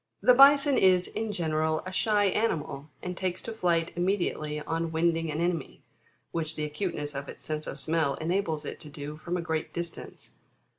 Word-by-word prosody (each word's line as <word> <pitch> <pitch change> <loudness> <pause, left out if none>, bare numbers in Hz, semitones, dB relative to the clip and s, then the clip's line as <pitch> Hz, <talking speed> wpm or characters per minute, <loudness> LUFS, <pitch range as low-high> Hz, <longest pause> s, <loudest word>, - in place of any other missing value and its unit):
The 250 - +6
Bison 280 +1 +7
is, 185 -1 +5
in 220 -1 -3
general, 155 -3 0
a 185 - -5
shy 205 +1 +2
animal, 160 -8 -1
and 180 0 -4
takes 185 -1 -2
to 230 - -5
flight 170 -5 +1
immediately 175 -5 0
on 165 +2 -2
wind 165 +1 +2
ing 165 -1 -2
an 150 +1 -2
enemy, 170 -4 -2 0.5
which 160 -1 -2
the 150 - -2
acuteness 150 -1 -3
of 140 0 -5
its - - -8
sense 155 0 -3
of - - -5
smell 155 -1 +1
enables 160 -2 -1
it - - -6
to 150 - -10
do 145 +1 -7
from 175 +3 -3
a - - -2
great 160 -1 -2
distance. 170 -1 -6
165 Hz, 190 wpm, -28 LUFS, 155-185 Hz, 0.5 s, Bison